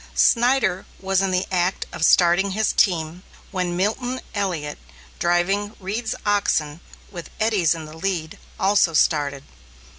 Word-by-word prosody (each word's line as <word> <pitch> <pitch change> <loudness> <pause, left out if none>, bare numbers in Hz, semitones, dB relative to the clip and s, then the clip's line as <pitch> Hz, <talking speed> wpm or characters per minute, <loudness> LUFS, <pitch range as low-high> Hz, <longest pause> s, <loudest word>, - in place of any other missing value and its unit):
Snyder 240 -6 +2
was 195 0 +1
in 195 - +1
the 185 0 0
act 180 0 0
of - - -4
starting 180 +3 +4
his 220 - +1
team, 170 -2 +1 0.3
when 180 -3 -2
Milton 245 +7 -1
Elliot, 175 -8 -3 0.4
driving 195 +5 0
Reed's 210 +4 -3
oxen, 165 -7 0 0.3
with 175 -4 -8
Eddy's 205 -7 +2
in 160 -1 -7
the 155 +1 -11
lead, 165 -2 -3 0.2
also 195 -3 +3
started. 145 -3 +1
185 Hz, 130 wpm, -22 LUFS, 165-205 Hz, 0.4 s, starting